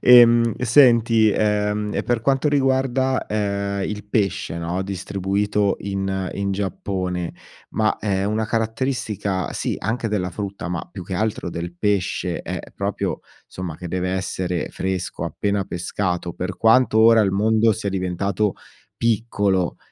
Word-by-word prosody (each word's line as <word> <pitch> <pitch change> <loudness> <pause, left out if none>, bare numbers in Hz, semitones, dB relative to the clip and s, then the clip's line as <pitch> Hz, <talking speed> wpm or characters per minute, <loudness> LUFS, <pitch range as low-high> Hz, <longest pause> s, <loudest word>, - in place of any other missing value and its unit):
Ehm, 120 -2 +7
senti, 115 -4 +5
ehm, 105 0 0
e - - 0
per 120 -2 0
quanto 135 +4 +2
riguarda, 130 -2 +1
ehm, 100 -1 -1
il 105 -1 -5
pesce, 100 -5 -1
no, 85 +3 -2
distribuito 100 +1 -1
in 95 -1 -2
in 100 0 -1
Giappone, 95 -3 -3 0.4
ma 110 -1 +1
è 100 -2 0
una 110 +2 0
caratteristica 110 -5 -1
sì - - -2
anche 115 0 -2
della 95 -4 -1
frutta, 100 -3 -5
ma 85 -1 -3
più 95 - -7
che 95 - -5
altro 105 -2 -1
del 85 +1 -5
pesce, 100 0 -1
è - - -4 0.2
proprio, - - -2 0.3
somma, 90 -4 -6
che 90 - -7
deve 90 +1 -1
essere 95 -2 -2
fresco, 95 -1 -3
appena 100 -1 -1
pescato. 90 -1 -2
Per 90 0 -4
quanto 115 0 +4
ora 115 0 +7
il 100 -2 +3
mondo 110 +3 +3
sia 100 - -3
diventato 95 +2 -1 0.4
piccolo, 105 -6 +1
100 Hz, 140 wpm, -22 LUFS, 95-110 Hz, 0.4 s, Ehm